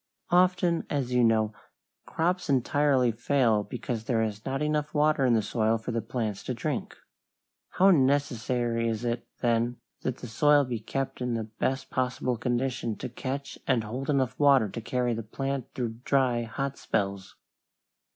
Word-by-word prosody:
Often, 180 Hz, -1 st, +3 dB
as 135 Hz, -4 st, -1 dB
you 125 Hz, -1 st, +4 dB
know, 110 Hz, -2 st, +3 dB, 0.5 s
crops 175 Hz, +1 st, -1 dB
entirely 135 Hz, -1 st, +3 dB
fail 115 Hz, -2 st, +2 dB
because 120 Hz, -1 st, -5 dB
there 115 Hz, -2 st, +1 dB
is 105 Hz, -1 st, -4 dB
not 135 Hz, 0 st, -2 dB
enough 150 Hz, 0 st, -1 dB
water 150 Hz, -2 st, +3 dB
in 120 Hz, -, +4 dB
the 110 Hz, -, +2 dB
soil 110 Hz, +1 st, +1 dB
for 110 Hz, +2 st, -5 dB
the 115 Hz, -1 st, -1 dB
plants 110 Hz, -3 st, -3 dB
to -, -, -2 dB
drink. -, -, -3 dB, 0.8 s
How 195 Hz, +2 st, +5 dB
necessary 125 Hz, -, +1 dB
is 115 Hz, +1 st, -3 dB
it, 120 Hz, 0 st, -2 dB
then, 120 Hz, 0 st, +1 dB, 0.2 s
that 130 Hz, -, -2 dB
the 125 Hz, -, -8 dB
soil 145 Hz, +5 st, +4 dB
be 120 Hz, -3 st, -3 dB
kept 135 Hz, +4 st, -4 dB
in 125 Hz, -1 st, -1 dB
the 115 Hz, -, -2 dB
best 130 Hz, +5 st, -3 dB
possible 125 Hz, 0 st, 0 dB
condition 120 Hz, -1 st, -1 dB
to -, -, -6 dB
catch 135 Hz, +3 st, -5 dB
and 125 Hz, -4 st, +2 dB
hold 125 Hz, +6 st, -5 dB
enough 130 Hz, -3 st, +1 dB
water 140 Hz, -7 st, +5 dB
to 115 Hz, -, -6 dB
carry 125 Hz, +1 st, 0 dB
the 115 Hz, -, -3 dB
plant 135 Hz, +4 st, -4 dB
through 115 Hz, -3 st, -3 dB
dry, 125 Hz, -4 st, +2 dB
hot 135 Hz, +4 st, -4 dB
spells! 100 Hz, -2 st, -2 dB
125 Hz, 165 wpm, -28 LUFS, 115-140 Hz, 0.8 s, How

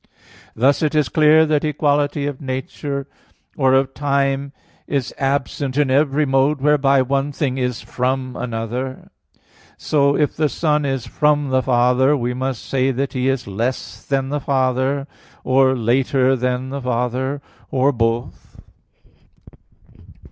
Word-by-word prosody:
Thus 135 Hz, +5 st, +2 dB
it 155 Hz, -1 st, 0 dB
is 150 Hz, -1 st, +2 dB
clear 155 Hz, 0 st, +5 dB
that 150 Hz, -2 st, +1 dB
equality 145 Hz, -1 st, 0 dB
of 145 Hz, -1 st, -5 dB
nature 140 Hz, +1 st, -4 dB, 0.5 s
or 130 Hz, -2 st, +3 dB
of 135 Hz, 0 st, +1 dB
time 140 Hz, -1 st, 0 dB, 0.4 s
is 135 Hz, -3 st, -2 dB
absent 135 Hz, 0 st, -1 dB
in 145 Hz, -3 st, +2 dB
every 145 Hz, +2 st, +2 dB
mode 135 Hz, +2 st, +2 dB
whereby 140 Hz, -1 st, +3 dB
one 135 Hz, +2 st, -1 dB
thing 135 Hz, -2 st, -2 dB
is 125 Hz, -2 st, -2 dB
from 130 Hz, 0 st, -2 dB
another. 125 Hz, +3 st, -5 dB, 0.7 s
So 140 Hz, -2 st, +1 dB
if 150 Hz, -2 st, 0 dB
the 155 Hz, -1 st, +1 dB
Son 150 Hz, -2 st, 0 dB
is 135 Hz, -3 st, -2 dB
from 150 Hz, -2 st, +1 dB
the 130 Hz, 0 st, +2 dB
Father, 125 Hz, +3 st, +3 dB
we 125 Hz, -1 st, -2 dB
must 130 Hz, -1 st, -4 dB
say 130 Hz, 0 st, 0 dB
that 135 Hz, +1 st, -2 dB
He 130 Hz, 0 st, 0 dB
is 135 Hz, -2 st, -1 dB
less 115 Hz, +6 st, -4 dB
than 135 Hz, -1 st, -1 dB
the 145 Hz, +1 st, -1 dB
Father, 135 Hz, 0 st, 0 dB, 0.4 s
or 130 Hz, 0 st, +3 dB
later 130 Hz, +3 st, +2 dB
than 125 Hz, +1 st, -2 dB
the 140 Hz, +1 st, -5 dB
Father, 125 Hz, +3 st, -2 dB, 0.3 s
or 135 Hz, +2 st, +2 dB
both. 115 Hz, -1 st, -3 dB
135 Hz, 140 wpm, -20 LUFS, 130-145 Hz, 0.7 s, clear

